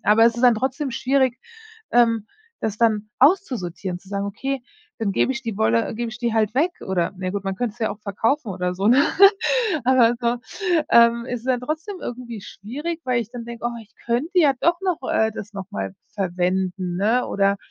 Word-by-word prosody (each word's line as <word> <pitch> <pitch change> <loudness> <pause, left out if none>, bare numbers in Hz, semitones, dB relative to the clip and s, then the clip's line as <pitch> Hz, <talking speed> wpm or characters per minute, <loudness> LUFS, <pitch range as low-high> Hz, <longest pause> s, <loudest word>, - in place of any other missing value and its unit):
Aber 215 +2 +5
es 230 0 +4
ist 240 - -3
dann 245 -2 +6
trotzdem 265 +5 -2
schwierig, 260 0 +1 0.5
ähm, 230 -3 +3 0.3
das 215 -2 -3
dann 215 -2 +1
auszusortieren, 215 - +1
zu 190 - -20
sagen: 200 0 -2
„Okay, 265 +6 -3 0.4
dann 215 -4 -1
gebe 225 - +2
ich 265 0 -6
die 225 -4 -4
Wolle 115 - +1
gebe 235 +1 -3
ich 240 - -9
die 235 -1 -1
halt 220 -1 +1
weg“ 320 +7 +2
oder 180 -3 0
ne 185 0 -3
gut, 200 -1 -4
man 195 0 -2
könnte 235 -2 -2
es 245 - -23
ja 220 - +1
auch 210 - -8
verkaufen 225 +6 -1
oder 180 -1 -2
so, 195 +2 -1
ne? 255 +4 +6 0.8
Aber 245 -2 +5
so, 235 0 +1 0.5
ähm, 235 0 +5
ist 245 -1 -5
dann 255 -2 +1
trotzdem 315 +9 -4
irgendwie 235 -2 -6
schwierig, 290 +14 -6
weil 250 -2 +1
ich 225 -1 -7
dann 240 -1 -7
denke: 235 0 -5
„Oh, 240 0 -3
ich 215 - -23
könnte 290 +11 0
ja 300 -5 +5
doch 340 +1 +2
noch, 365 -4 0
äh, 220 0 +2
das 210 -1 -8
noch 195 -2 -7
mal 95 -1 -4 0.2
verwenden, 185 -1 -1
ne?“ 225 +6 +2
Oder 200 0 +1
230 Hz, 205 wpm, -22 LUFS, 200-255 Hz, 0.8 s, dann